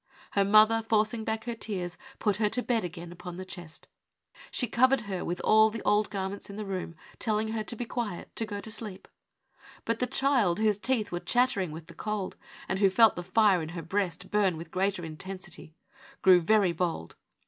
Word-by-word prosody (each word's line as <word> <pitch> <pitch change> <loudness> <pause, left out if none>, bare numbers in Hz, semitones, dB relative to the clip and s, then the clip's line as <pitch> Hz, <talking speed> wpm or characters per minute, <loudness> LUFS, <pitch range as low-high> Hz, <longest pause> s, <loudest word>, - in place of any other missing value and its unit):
Her 200 - +3
mother, 215 +3 +6
forcing 220 +1 +2
back 220 0 -2
her 240 - -3
tears, 190 -6 -4 0.2
put 205 -3 +1
her 210 -1 +2
to 250 +3 0
bed 235 -3 +1
again 175 -1 -7
upon 180 0 -8
the 185 - -6
chest. 175 -4 -9 0.6
She 250 - -1
covered 255 +3 +3
her 195 -5 -4
with 175 +1 -3
all 220 0 +5
the 225 0 -6
old 210 +1 +2
garments 195 0 -4
in 200 - -8
the 215 0 -5
room, 185 -4 -4 0.2
telling 220 -1 0
her 220 -1 -2
to 235 - -3
be 245 - -4
quiet, 225 -7 -5
to 225 - -1
go 205 -1 -4
to 220 - -5
sleep. 210 -4 -6 0.8
But 230 0 -1
the 250 - 0
child, 250 -12 +2
whose 215 -2 +2
teeth 230 -1 0
were 175 - -2
chattering 240 -5 +1
with 160 +1 -8
the - - -13
cold, 210 -3 -3 0.3
and 190 - -1
who 200 -1 +5
felt 220 +3 +5
the 175 - -4
fire 190 0 +3
in 155 - -5
her 165 0 -6
breast 180 0 -2
burn 195 -5 +2
with 165 +1 -9
greater 190 -1 0
intensity, 175 0 -8 0.5
grew 185 -2 +7
very 200 +1 +3
bold. 170 - -3
200 Hz, 205 wpm, -29 LUFS, 180-220 Hz, 0.8 s, grew